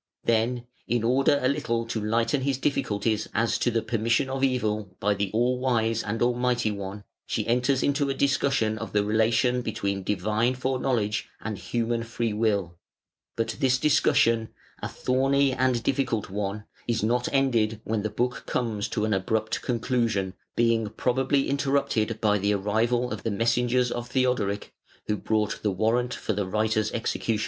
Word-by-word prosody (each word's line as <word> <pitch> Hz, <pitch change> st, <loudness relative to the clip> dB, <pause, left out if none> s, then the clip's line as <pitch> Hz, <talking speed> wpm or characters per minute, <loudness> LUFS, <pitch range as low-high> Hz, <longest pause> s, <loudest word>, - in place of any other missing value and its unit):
Then, 115 Hz, +2 st, +1 dB, 0.2 s
in 120 Hz, -1 st, 0 dB
order 135 Hz, +4 st, +3 dB
a -, -, +4 dB
little 120 Hz, -5 st, 0 dB
to 115 Hz, -1 st, -3 dB
lighten 115 Hz, +6 st, +1 dB
his 135 Hz, -1 st, 0 dB
difficulties 110 Hz, -6 st, 0 dB
as 115 Hz, +1 st, +1 dB
to -, -, +2 dB
the 115 Hz, -1 st, 0 dB
permission 115 Hz, +4 st, 0 dB
of 135 Hz, 0 st, -2 dB
evil 110 Hz, -7 st, 0 dB
by 105 Hz, +1 st, +2 dB
the 100 Hz, -1 st, -2 dB
All 120 Hz, +4 st, +1 dB
wise 115 Hz, -3 st, +1 dB
and 110 Hz, +3 st, -2 dB
Almighty 120 Hz, -2 st, +1 dB
One, 100 Hz, 0 st, -6 dB, 0.2 s
she -, -, -1 dB
enters 125 Hz, +3 st, +2 dB
into 140 Hz, 0 st, +1 dB
a 135 Hz, -, -1 dB
discussion 135 Hz, -6 st, +1 dB
of -, -, -6 dB
the 105 Hz, -1 st, +3 dB
relation 115 Hz, +4 st, +2 dB
between 100 Hz, -4 st, -2 dB
Divine 105 Hz, +6 st, 0 dB
Foreknowledge 125 Hz, -5 st, -1 dB
and 110 Hz, 0 st, -4 dB
Human 115 Hz, +3 st, -1 dB
Free 115 Hz, -1 st, -2 dB
will, 100 Hz, -6 st, 0 dB, 0.6 s
but 115 Hz, -, -2 dB
this 130 Hz, -3 st, +3 dB
discussion, 115 Hz, -6 st, +3 dB, 0.3 s
a -, -, -2 dB
thorny 135 Hz, +2 st, +1 dB
and 130 Hz, -2 st, +1 dB
difficult 120 Hz, -7 st, -1 dB
one, 100 Hz, +1 st, -3 dB, 0.2 s
is 115 Hz, -3 st, 0 dB
not 120 Hz, +3 st, +1 dB
ended 115 Hz, -6 st, +2 dB
when 110 Hz, -1 st, -1 dB
the 110 Hz, -, -2 dB
book 125 Hz, +3 st, -2 dB
comes 110 Hz, -4 st, -1 dB
to 105 Hz, -, -1 dB
an 110 Hz, -, 0 dB
abrupt 110 Hz, +3 st, -1 dB
conclusion, 115 Hz, -6 st, 0 dB, 0.2 s
being 115 Hz, -2 st, +2 dB
probably 130 Hz, +5 st, +1 dB
interrupted 135 Hz, -6 st, 0 dB
by 105 Hz, -1 st, +2 dB
the 100 Hz, +2 st, +1 dB
arrival 115 Hz, +5 st, 0 dB
of -, -, -4 dB
the -, -, -2 dB
messengers 120 Hz, +3 st, +1 dB
of 120 Hz, 0 st, -4 dB
Theodoric, 125 Hz, -6 st, 0 dB, 0.3 s
who 105 Hz, -, 0 dB
brought 105 Hz, 0 st, -1 dB
the 105 Hz, -, +1 dB
warrant 115 Hz, +5 st, 0 dB
for 110 Hz, -, -2 dB
the 100 Hz, -1 st, -2 dB
writer's 110 Hz, +2 st, 0 dB
execution. 115 Hz, -1 st, -1 dB
115 Hz, 165 wpm, -26 LUFS, 105-125 Hz, 0.6 s, a